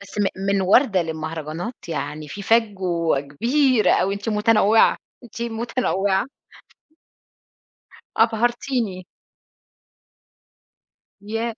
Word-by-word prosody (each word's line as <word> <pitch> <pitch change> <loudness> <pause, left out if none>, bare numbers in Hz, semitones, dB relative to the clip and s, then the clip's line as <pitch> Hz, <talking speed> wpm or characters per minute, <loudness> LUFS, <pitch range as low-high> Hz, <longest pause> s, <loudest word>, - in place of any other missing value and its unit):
بس 200 +1 -10
م - - +2 0.2
من 200 0 +1
وردة 195 0 +4
للمهرجانات؟ 160 - -6
يعني 150 -1 -5
في 200 +6 -7
فجوة 185 -9 +1
كبيرة 235 - +1
أوي. 195 +1 +1
أنتِ 205 +3 -6
متنوعة، 215 0 +4 0.3
أنتِ 235 0 -8
متنوعة. 225 -3 -1 1.9
أبهرتيني. 230 -3 0 2.2
ياه! 225 +2 -4
205 Hz, 85 wpm, -22 LUFS, 175-230 Hz, 2.2 s, وردة